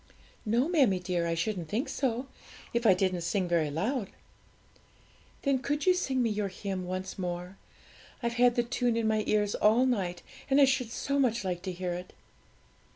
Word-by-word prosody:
'No, 235 +6 +2
mammie 270 - +3
dear, 180 -2 -1
I 165 - 0
shouldn't 170 -2 -2
think 240 +8 -1
so, 250 -1 -1 0.5
if 235 -1 +2
I 190 - +7
didn't 185 -1 0
sing 180 +2 0
very 170 -3 +1
loud.' 200 - -2 1.3
'Then 275 -2 +2
could 290 +3 -2
you 370 - +6
sing 265 -8 0
me 230 - +1
your 210 -1 -1
hymn 190 -1 -5
once 185 +1 -5
more? 180 +1 -4 0.7
I've 235 0 0
had 245 -1 +5
the 240 - +2
tune 240 -1 0
in 225 -1 +1
my 215 -1 +1
ears 210 -1 +2
all 225 +5 +4
night, 185 -9 -1 0.3
and 275 +1 +4
I 280 - +8
should 265 -3 0
so 280 +4 -1
much 235 -5 +2
like 180 -2 -2
to 185 0 -4
hear 180 0 -3
it.' 180 +1 -7
210 Hz, 185 wpm, -29 LUFS, 180-250 Hz, 1.3 s, I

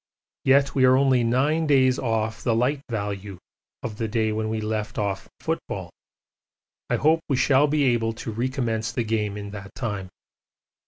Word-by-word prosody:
Yet 140 +1 +4
we 135 - +2
are 130 0 +6
only 130 -3 +3
nine 145 +7 +2
days 130 -3 +4
off 110 -2 -1
the 115 -3 +2
'light 130 +5 +1
value' 100 -3 -4 0.5
of 110 -4 -5
the 115 - -1
day 110 0 0
when 110 0 -2
we 110 0 -1
left 110 0 -3
off 100 -2 -2
football - - -4 1.0
I - - +2
hope 160 +3 +3
we 135 - +2
shall 135 +2 +4
be 150 0 +1
able 115 -3 +2
to 115 0 -6
recommence 115 -1 -1
the 120 - -1
game 105 -2 -1
in 100 -1 -6
that 100 -1 -9
time. 100 -7 -4
115 Hz, 170 wpm, -24 LUFS, 110-130 Hz, 1.0 s, are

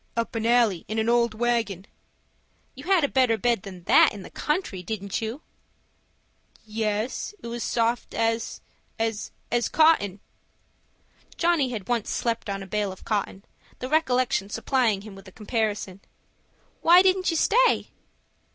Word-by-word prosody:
"Up 230 +2 -1
an 225 -1 -1
alley 230 -7 +3
in 220 - -4
an 220 +1 +1
old 235 -2 +2
wagon." 225 -5 -1 0.9
"You - - -11
had 370 -3 +3
a - - +4
better 255 -4 +2
bed 235 -3 +1
than 185 -3 -10
that - - +6
in 205 -2 -9
the - - -11
country, 300 - -2
didn't 200 +2 -4
you?" 225 +7 -5 1.2
"Yes, 215 - -2
it - - -14
was 235 0 -4
as - - -2
soft 235 0 -1
as—as 225 -1 -3 0.4
cotton." 305 - +3 1.2
Johnny 335 -6 +2
had 215 -6 -6
once 235 -3 -1
slept 230 -2 -2
on 195 0 -3
a - - -9
bale 205 0 -2
of 185 - -12
cotton, 200 -2 -2 0.3
the 255 - -6
recollection 255 -9 +1
supplying 225 -2 +1
him 210 0 -10
with 195 0 -13
a - - -12
comparison. 210 -3 -3 0.8
"Why 355 +2 +7
didn't 375 0 +2
you 330 - 0
stay?" - - +3
225 Hz, 150 wpm, -25 LUFS, 205-255 Hz, 1.2 s, Why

